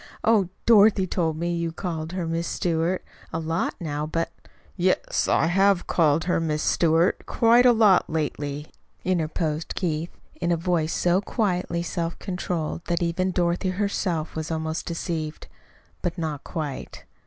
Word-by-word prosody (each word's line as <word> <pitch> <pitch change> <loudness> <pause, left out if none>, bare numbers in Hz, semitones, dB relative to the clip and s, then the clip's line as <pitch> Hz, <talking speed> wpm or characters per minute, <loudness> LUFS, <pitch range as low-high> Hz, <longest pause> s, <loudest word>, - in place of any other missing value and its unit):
Oh, 215 -5 +3 0.2
Dorothy 210 -3 +6
told 165 -4 -1
me 170 +1 -1
you 170 -1 -1
called 165 -1 -4
her 185 -2 -2
'Miss 165 +1 -2
Stewart' 170 +1 -1 0.3
a - - -2
lot 165 +1 -1
now; 150 -2 -3
but 165 +1 -2 0.3
" - - -32
"Yes, 185 0 +1
I - - +3
have 195 +2 +3
called 160 -2 +2
her 175 0 +1
'Miss 155 -2 -1
Stewart' 165 +1 +2
quite 240 +2 +5
a - - +8
lot 215 -5 +4
lately," 150 -2 -2 0.4
interposed 160 -3 -1
Keith, 165 -2 -1 0.2
in 175 0 -2
a 170 - +2
voice 165 -2 0
so 180 +2 +2
quietly 180 -6 -1
self 170 -1 -3
controlled 180 -4 -3
that 175 0 0
even 170 +2 0
Dorothy 175 +1 0
herself 185 -4 -1
was 160 0 -3
almost 160 0 -3
deceived. 165 -2 -4 0.6
But 175 +1 -2
not 155 -4 -3
quite. 150 -6 -5
170 Hz, 155 wpm, -25 LUFS, 160-185 Hz, 0.6 s, a